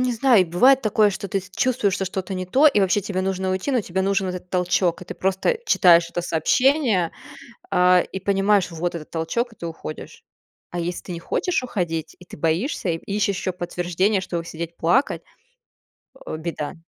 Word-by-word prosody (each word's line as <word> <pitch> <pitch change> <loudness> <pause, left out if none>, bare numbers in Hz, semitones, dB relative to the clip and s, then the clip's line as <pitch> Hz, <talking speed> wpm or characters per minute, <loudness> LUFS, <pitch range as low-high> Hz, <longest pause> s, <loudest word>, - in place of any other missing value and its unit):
не 255 -1 +1
знаю, 235 -3 +4
и - - -2
бывает 255 +11 +4
такое, 215 0 +3
что 200 0 -4
ты 195 +1 -1 0.2
чувствуешь, 235 -7 +1
что 190 - -2
что-то 190 +1 -4
не 185 0 -3
то 265 +12 +4
и 245 -8 +4
вообще 195 +1 +2
тебе 185 -1 -3
нужно 190 0 -1
уйти. 185 +9 -2
Но 255 -3 +2
тебе 190 -2 -2
нужен 195 0 0
этот 180 0 -6
толчок, 180 -1 +1
и - - -9
ты - - -7
просто 190 - 0
читаешь 170 - +5
это - - -2
сообщение, 205 - +2 0.6
а, 180 0 +5
и 190 - -4
понимаешь, 195 0 +2
вот 170 +1 -3
этот 155 -2 -8
толчок, 225 +9 -2
и - - -22
ты 170 - -8
уходишь. 160 -1 -9 0.5
А 175 - -3
если 175 +1 -3
ты - - -8
не 170 - -5
хочешь 330 - -1
уходить 170 -9 -3
и 180 - -14
ты - - -12
боишься, 170 - -1
и 165 - 0
ищешь 200 +1 -1
ещё 185 - -3
подтверждение, 180 +3 -1
чтобы 170 -2 -4
сидеть 170 0 -6
плакать. 245 - +1 1.0
О, - - -5
беда. 160 -2 -4
185 Hz, 195 wpm, -22 LUFS, 175-205 Hz, 1.0 s, читаешь